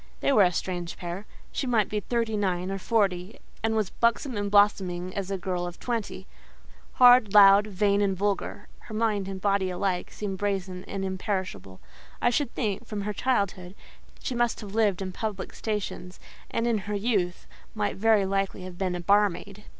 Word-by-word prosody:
They - - +2
were 215 - +6
a 180 -2 +5
strange 175 0 -4
pair. 180 +3 -6 0.2
She 270 - -2
might 225 -4 +2
be 210 - -2
thirty 230 +1 -1
nine 185 -2 -1
or 195 - -3
forty, 195 -3 0 0.2
and 225 0 0
was 215 -4 0
buxom 235 +2 0
and 205 0 -2
blooming 185 -3 +2
as 195 -1 -3
a 195 - -1
girl 180 -1 -3
of 175 - -9
twenty. 225 -5 -3 0.7
Hard, 245 -5 +6
loud, 200 0 +8
vain 200 0 +1
and 195 -2 +1
vulgar, 200 0 -2
her 215 - -9
mind 215 -3 0
and 195 -1 -5
body 195 -1 +1
alike 180 0 -2
seemed 195 -3 -5
brazen 190 -2 -2
and 195 -1 -4
imperishable. 190 - -4 0.4
I 240 - +2
should 280 -1 0
think, 215 0 -2
from 210 -2 -4
her 210 +1 -3
childhood, 200 -6 -1 0.5
she - - -2
must 240 -1 0
have 205 -2 -8
lived 205 -4 +2
in 185 - -4
public 200 0 -5
stations; 205 -4 -4 0.3
and 230 - -1
in 230 -3 +1
her 210 - -1
youth 200 -4 -1 0.3
might 210 -1 -1
very 215 -1 +3
likely 195 -1 -1
have 180 -1 -9
been 185 -2 -1
a 175 - -4
barmaid. 200 +1 +1
200 Hz, 180 wpm, -27 LUFS, 185-215 Hz, 0.7 s, loud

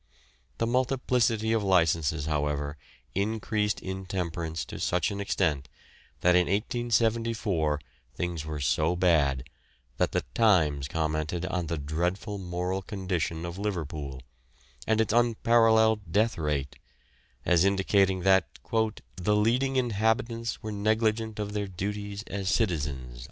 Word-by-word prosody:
The 115 - +1
multiplicity 120 -3 +1
of 115 - +2
licences, 80 -5 +2
however, 75 -1 -1 0.4
increased 105 +1 0
intemperance 90 -4 -3
to - - -8
such 90 +3 +1
an 100 0 -4
extent 80 -8 0 0.5
that 90 - +5
in 90 -1 +4
1874 110 -6 0 0.4
things 85 0 -3
were 75 -1 -5
so 75 +5 +1
bad 75 -8 +2 0.5
that - - +1
the - - 0
Times 80 - +3
commented 80 +3 -2
on 90 -2 -2
the 85 +1 -2
dreadful 90 +8 -2
moral 90 +1 -2
condition 90 -4 -3
of 85 +2 -6
Liverpool, 75 -9 -4 0.6
and 110 0 +2
its 110 -1 +2
unparalleled 110 -4 +3
death 110 +4 +2
rate, 75 -4 -2 0.7
as 85 -1 +4
indicating 95 -1 +2
that 95 +1 +4 0.7
"the 105 +4 +2
leading 125 +6 +2
inhabitants 115 0 0
were 110 - -4
negligent 110 +1 0
of 105 -1 -3
their 105 -1 -2
duties 100 +2 -4
as 95 -1 -3
citizens." 75 - -1
95 Hz, 120 wpm, -28 LUFS, 80-110 Hz, 0.7 s, that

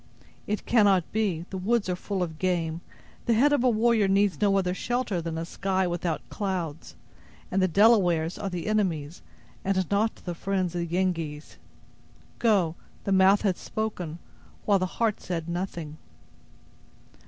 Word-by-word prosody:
"It 210 0 -2
cannot 200 -6 +4
be. 195 -7 -1
The 190 - -4
woods 220 +3 +1
are 180 - 0
full 190 0 -2
of 160 -3 -6
game. 170 -3 -1 0.5
The 230 - +4
head 290 +6 +4
of 285 - +2
a 255 - +5
warrior 225 -2 +3
needs 195 -3 +2
no 200 -1 +4
other 180 -2 +1
shelter 240 -3 -1
than 165 0 -4
a 165 - -3
sky 190 +2 -1
without 175 -2 -2
clouds; 180 -6 -4 0.6
and 195 - +2
the 185 - +4
Delawares 180 -4 +3
are 200 - -3
the 180 -2 -4
enemies, 175 -8 -1 0.4
and 190 -2 0
not 215 +2 +2
the 175 - -6
friends 185 0 -1
of 175 - -2
the 170 - -3
Yengeese. 165 -4 -2 0.8
Go, 200 -8 +3 0.3
the 195 - -2
mouth 190 +2 +5
has 190 -4 +1
spoken, 185 -7 -4 0.5
while 200 -2 +4
the 185 - 0
heart 225 -3 +1
said 165 -3 -4
nothing." 170 -3 -4
185 Hz, 160 wpm, -27 LUFS, 170-205 Hz, 0.8 s, a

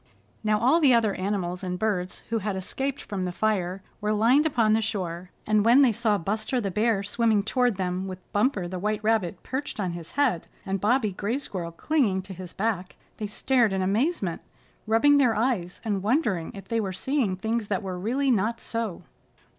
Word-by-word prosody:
Now 215 0 +2
all 260 +9 +4
the 275 -6 +6
other 220 -3 +2
animals 185 -2 -2
and 180 -1 -2
birds 185 -3 -2
who 230 - +1
had 205 -1 -2
escaped 270 +9 -3
from 190 -3 -3
the 180 - -2
fire 190 -2 -1 0.2
were 210 0 0
lined 245 +8 +4
upon 230 -7 +2
the 220 - +3
shore, 180 -4 -3 0.2
and 215 -1 +3
when 240 +5 +6
they 255 - +5
saw 220 -1 +1
Buster 215 +7 -1
the 200 -4 -2
Bear 215 0 +1
swimming 215 0 +2
toward 245 +1 +1
them 185 0 -2
with 185 -1 -5 0.2
Bumper 205 -4 +1
the 185 +1 -5
White 210 +2 -1
Rabbit 210 -5 0
perched 265 -2 -4
on 185 -3 -1
his 170 -1 -8
head 260 - +1 0.2
and 195 -1 -2
Bobby 220 0 +2
Gray 205 +6 -2
Squirrel 185 -11 -4
clinging 200 - +1
to 190 0 -8
his 180 -1 -9
back 195 -3 -2 0.2
they 210 - -3
stared 235 0 +2
in 190 -1 0
amazement, 205 - 0 0.5
rubbing 285 +7 +5
their 245 -5 +3
eyes, 215 -6 -1
and 205 -3 0
wondering 210 - 0
if 195 - -10
they 230 -1 0
were 190 -3 -3
seeing 255 -3 0
things 220 +3 -2
that 200 -2 -1
were 185 -2 -4
really 260 +8 +1
not 230 +1 +1
so. 230 -6 -4
210 Hz, 195 wpm, -26 LUFS, 190-235 Hz, 0.5 s, the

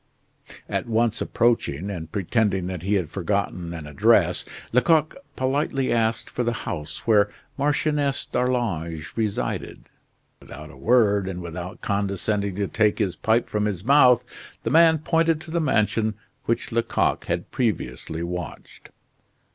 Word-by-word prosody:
At - - -2
once 115 0 +1
approaching 100 -7 0
and 80 -4 -6
pretending 100 0 0
that 90 -2 -4
he 100 +4 0
had 85 -5 -1
forgotten 95 -2 -2
an 80 -3 -6
address, 75 -2 +3 0.3
Lecoq 155 +5 +3 0.2
politely 135 0 0
asked 115 -1 0
for 125 - -2
the 120 0 0
house 75 -1 -5
where 105 -3 +4 0.3
Marchioness 145 -1 0
d'Arlange 90 -12 -2
resided. 110 -3 -2 0.6
Without 75 +2 -11
a - - -15
word, 105 -5 +3
and 95 -2 -4
without 85 +1 -7
condescending 100 0 -1
to 100 0 -1
take 105 +1 +2
his 95 -5 0
pipe 110 +5 +1
from 105 0 -1
his 95 -4 -2
mouth, 125 -1 +5 0.4
the - - -1
man 165 0 +6
pointed 165 +1 +1
to 160 - -10
the 170 0 +1
mansion 110 -5 +1 0.3
which 115 - -1
Lecoq 115 0 0
had 85 0 -3
previously 85 - -2
watched. 90 -1 -7
105 Hz, 140 wpm, -24 LUFS, 90-125 Hz, 0.6 s, man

